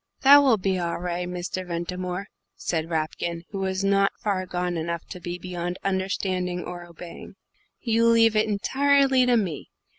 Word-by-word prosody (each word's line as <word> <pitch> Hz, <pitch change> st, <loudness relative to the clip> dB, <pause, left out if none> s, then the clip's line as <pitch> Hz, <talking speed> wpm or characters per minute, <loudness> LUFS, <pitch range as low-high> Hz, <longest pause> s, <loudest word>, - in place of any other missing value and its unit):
"That 280 Hz, +1 st, +9 dB
will 260 Hz, -6 st, +4 dB
be 190 Hz, -1 st, 0 dB
all 170 Hz, -1 st, -2 dB
ri', 175 Hz, 0 st, -3 dB
Mr. 180 Hz, +1 st, -4 dB
Ventimore," 180 Hz, +2 st, -4 dB, 0.3 s
said 165 Hz, -1 st, -2 dB
Rapkin, 165 Hz, +1 st, -2 dB
who 195 Hz, -, -4 dB
was 190 Hz, 0 st, -1 dB
not 195 Hz, 0 st, +3 dB
far 190 Hz, -3 st, -2 dB
gone 180 Hz, -1 st, -2 dB
enough 170 Hz, +1 st, -3 dB
to 180 Hz, -, -7 dB
be 175 Hz, 0 st, -5 dB
beyond 175 Hz, 0 st, -4 dB
understanding 190 Hz, -2 st, -1 dB
or 175 Hz, -1 st, -7 dB
obeying. 170 Hz, 0 st, -11 dB, 0.5 s
"You 230 Hz, -1 st, +2 dB
leave 225 Hz, -1 st, +5 dB
it 215 Hz, +1 st, +3 dB
entirely 270 Hz, +4 st, +3 dB
to 245 Hz, -1 st, +4 dB
me. 180 Hz, -9 st, -3 dB
185 Hz, 160 wpm, -25 LUFS, 175-205 Hz, 0.5 s, That